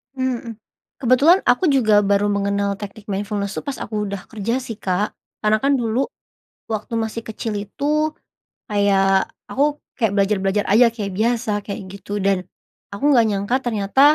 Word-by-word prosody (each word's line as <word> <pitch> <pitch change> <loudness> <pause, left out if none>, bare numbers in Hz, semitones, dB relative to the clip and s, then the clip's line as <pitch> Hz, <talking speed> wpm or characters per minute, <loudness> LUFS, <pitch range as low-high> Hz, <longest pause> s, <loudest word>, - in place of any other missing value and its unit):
Mhm, 240 -4 -3 0.4
Kebetulan 275 +9 +5
aku 245 +9 +4
juga 215 -6 +4
baru 200 +1 +3
mengenal 200 0 0
teknik 205 +1 -9
mindfulness 200 0 -2
tuh - - -3
pas 280 - -2
aku 210 -1 -2
udah 200 -1 -4
kerja 230 +4 -2
sih 230 -4 -7
Kak, 190 +2 0 0.3
karena 215 0 +3
kan 280 +1 +4
dulu, 235 +3 0 0.7
waktu 220 +2 -3
masih 225 0 -2
kecil 220 0 -4
itu, 300 +9 -1 0.6
kayak 195 -2 +3 0.2
aku 290 +2 +1 0.2
kayak 220 -4 +2
belajar-belajar 195 0 +1
aja 235 +4 +7
kayak 205 -4 -4
biasa 235 0 +1 0.2
kayak 200 - -4
gitu 205 +1 -5
dan, 195 -1 +3 0.6
aku 200 - -8
enggak 235 -3 +6
nyangka 205 +4 0
ternyata, 220 -1 0
215 Hz, 155 wpm, -21 LUFS, 200-240 Hz, 0.7 s, aja